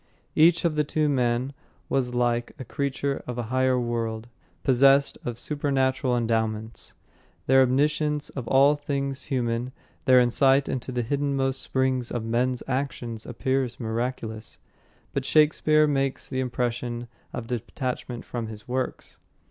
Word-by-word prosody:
Each 165 +2 +5
of 165 -2 +1
the 150 - +2
two 150 +1 0
men 125 -1 0 0.3
was 125 -2 -1
like 120 -1 0
a 130 - -7
creature 140 +2 -2
of 125 -1 -4
a 120 - -1
higher 130 -1 +3
world, 115 -2 -2 0.4
possessed 135 +1 +4
of 120 -2 -4
supernatural 130 -3 +1
endowments. 110 -1 -2 0.5
Their 135 0 +5
omniscience 150 +3 +1
of 125 -5 -6
all 140 +2 +5
things 140 -2 -3
human, 120 -1 -1 0.3
their 130 -1 +7
insight 135 +3 +4
into 130 0 -3
the 120 -1 -1
hiddenmost 135 0 0
springs 130 -2 0
of 120 -2 -3
men's 125 +2 0
actions 125 -4 -3
appear 130 +2 0
miraculous. 115 -1 -4 0.6
But 140 - -1
Shakespeare 155 +1 +4
makes 135 -2 -1
the 130 - -3
impression 120 -1 -2 0.2
of 120 - -5
detachment 125 +1 -4
from 120 -2 -4
his 110 -1 -10
works. 130 0 -4
130 Hz, 135 wpm, -26 LUFS, 120-140 Hz, 0.6 s, their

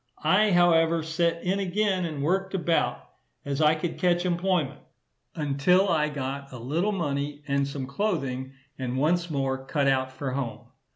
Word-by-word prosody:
I, 190 +7 +4
however, 165 -2 +4
set 165 +1 0
in 190 +2 0
again, 195 -1 0
and 150 -4 -4
worked 190 +4 0
about 170 -2 0 0.4
as 140 +1 -2
I 155 0 +5
could 160 +2 -4
catch 175 -1 +2
employment, 175 -5 0 0.6
until 155 +6 +2
I 150 -3 +2
got 140 -1 -5
a 130 - -8
little 155 - -1
money, 145 -5 -2
and 140 0 +1
some 140 -1 -4
clothing; 135 -5 -2 0.3
and 130 -1 -2
once 170 +5 +1
more 135 -3 -1
cut 140 +1 0
out 130 -1 +1
for 130 0 -4
home. 125 -5 -3
155 Hz, 160 wpm, -26 LUFS, 140-175 Hz, 0.6 s, I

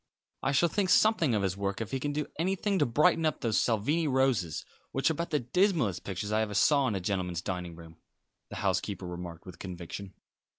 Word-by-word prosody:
"I 135 - +1
shall 145 +5 +4
think 190 +3 0
something 180 - +4
of 100 - 0
his 95 -1 0
work 100 0 -2
if 115 -1 -4
he 135 - -1
can 145 +2 -2
do 150 0 -1
anything 195 +3 0
to - - +3
brighten 150 +6 +3
up 155 -3 0
those 110 -3 +2
Salvini 145 +9 +1
Roses, 130 - +1 0.3
which 135 +4 +2
are - - +1
about 170 +2 -3
the 150 -3 +1
dismallest 140 - +1
pictures 100 +2 -4
I 110 +1 +2
ever 105 -2 -2
saw 140 +5 +4
in 110 - -1
a - - -1
gentleman's 90 -2 -2
dining 90 -3 -4
room," 80 -1 -13 0.5
the - - -7
housekeeper 100 -2 -1
remarked 90 -2 -7
with 90 -2 -11
conviction. 90 +1 -7
110 Hz, 210 wpm, -30 LUFS, 95-150 Hz, 0.5 s, shall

